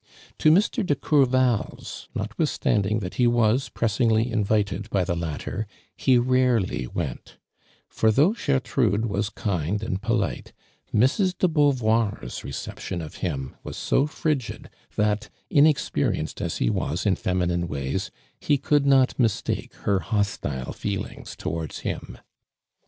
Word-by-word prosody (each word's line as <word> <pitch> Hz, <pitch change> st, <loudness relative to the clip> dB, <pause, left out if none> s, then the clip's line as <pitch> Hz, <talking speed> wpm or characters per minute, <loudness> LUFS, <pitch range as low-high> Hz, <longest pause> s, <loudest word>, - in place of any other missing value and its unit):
To 155 Hz, -, +5 dB
Mr. 205 Hz, +8 st, +3 dB
de 150 Hz, -6 st, +1 dB
Courval's, 130 Hz, -5 st, +1 dB
notwithtiUmiiiug 105 Hz, +2 st, 0 dB
that 90 Hz, -2 st, -5 dB
he 120 Hz, -, +5 dB
was 120 Hz, +2 st, +2 dB
pressingly 115 Hz, +1 st, +1 dB
invited 105 Hz, -1 st, 0 dB
by 95 Hz, -4 st, +1 dB
the 85 Hz, -1 st, -1 dB
latter, 85 Hz, +5 st, -4 dB, 0.4 s
ho 130 Hz, -2 st, +5 dB
rarely 125 Hz, -, +1 dB
went, 70 Hz, -3 st, -5 dB, 0.5 s
for 110 Hz, -, +2 dB
though 150 Hz, -, +4 dB
Gertrude 130 Hz, -, +1 dB
was 100 Hz, -1 st, -1 dB
kind 100 Hz, -2 st, -2 dB
and 95 Hz, -3 st, -2 dB
polite, 115 Hz, -, -1 dB, 0.4 s
Mrs. 175 Hz, -, +2 dB
de 185 Hz, -, +3 dB
Beauvoir's 115 Hz, -, +1 dB
rect -, -, -6 dB
ption 90 Hz, -, -3 dB
of 75 Hz, -, -11 dB
him 70 Hz, -7 st, -3 dB
was -, -, -7 dB
so 140 Hz, -, +2 dB
frigid 150 Hz, -5 st, -3 dB, 0.2 s
that, 105 Hz, +1 st, 0 dB, 0.2 s
inexperiejiced 150 Hz, +1 st, +2 dB
as -, -, -2 dB
he -, -, +1 dB
was -, -, -2 dB
in -, -, +3 dB
feminine 90 Hz, -1 st, 0 dB
ways, 70 Hz, -3 st, -3 dB, 0.3 s
he 145 Hz, -, +2 dB
could 140 Hz, +1 st, +2 dB
not 135 Hz, -1 st, +4 dB
mistake 115 Hz, -4 st, 0 dB
her 100 Hz, -2 st, +3 dB
hostile 100 Hz, -, -2 dB
feelings -, -, -5 dB
towards 80 Hz, -3 st, -4 dB
him. -, -, -5 dB
110 Hz, 130 wpm, -25 LUFS, 95-130 Hz, 0.5 s, To